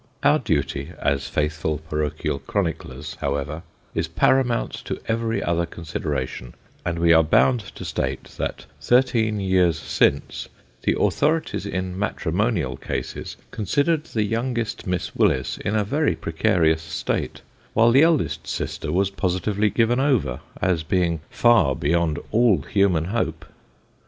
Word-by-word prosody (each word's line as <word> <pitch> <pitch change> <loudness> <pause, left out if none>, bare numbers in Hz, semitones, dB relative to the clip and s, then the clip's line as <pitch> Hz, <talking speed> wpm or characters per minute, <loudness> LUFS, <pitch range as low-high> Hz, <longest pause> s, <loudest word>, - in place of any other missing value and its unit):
Our 150 +1 +5
duty 75 - -1
as 70 -1 0
faithful 75 0 -1
parochial 75 -2 -2
chroniclers, 75 -5 -3
however, 70 +3 -2 0.3
is - - -1
paramount 125 -3 +2
to - - -4
every 115 0 0
other 85 0 0
consideration, 70 -7 -4 0.3
and 85 -1 -2
we 85 0 +5
are 80 - +7
bound 120 +10 +4 0.2
to - - -7
state, 65 +1 -2 0.2
that - - -3 0.2
thirteen 120 -4 +2
years 95 -4 +2
since, 70 -3 0 0.3
the - - +1
authorities 155 -9 +1
in 95 -1 -3
matrimonial 95 - -1
cases, - - -5
considered 145 - 0
the 110 -8 -1
youngest 115 +1 -2
Miss 90 -1 -2
Willis 65 0 +1
in 100 - -2
a 105 - +2
very 145 +9 +1
precarious 80 -2 +1
state, 80 - -3 0.3
while 115 +1 +5
the 135 +4 +6
eldest 160 -3 +2
sister - - -3
was 95 +3 +1
positively 100 +2 0
given 120 +3 +2
over, 130 - +1 0.2
as 90 -3 +1
being 85 0 0
far 120 - +4
beyond 85 +1 +1
all 110 -7 +4
human 95 -6 +2
hope. 115 +6 -2
90 Hz, 130 wpm, -23 LUFS, 80-115 Hz, 0.3 s, are